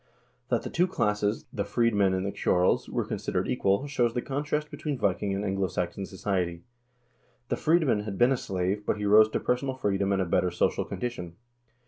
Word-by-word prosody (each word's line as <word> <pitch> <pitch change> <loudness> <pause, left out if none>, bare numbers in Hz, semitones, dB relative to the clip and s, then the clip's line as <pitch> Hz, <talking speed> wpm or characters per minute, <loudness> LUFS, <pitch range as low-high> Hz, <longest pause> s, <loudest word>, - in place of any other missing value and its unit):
That - - +1
the - - -6
two 180 +2 +2
classes, 105 - 0
the 100 - -1
freedmen 105 -6 +2
and 95 +1 -2
the 100 - -1
ceorls, 90 0 +2
were - - -1
considered - - -2
equal, 100 +7 +1
shows 125 -5 0
the 120 - 0
contrast 150 +2 -2
between 150 -3 -3
Viking 100 -2 0
and 100 +1 -2
Anglo 95 -1 0
Saxon 90 +2 -3
society. 90 -3 -2 0.9
The - - +1
freedman 155 -8 +2
had 105 -2 -5
been 120 +2 +4
a 135 - +2
slave, 95 0 -2
but 105 - -1
he 105 - -3
rose 110 +2 +6
to - - -1
personal 130 +2 -1
freedom 100 -5 0
and 100 - +1
a 95 - +1
better 90 +1 +1
social 90 - 0
condition. 90 -9 -5
105 Hz, 190 wpm, -28 LUFS, 95-125 Hz, 0.9 s, rose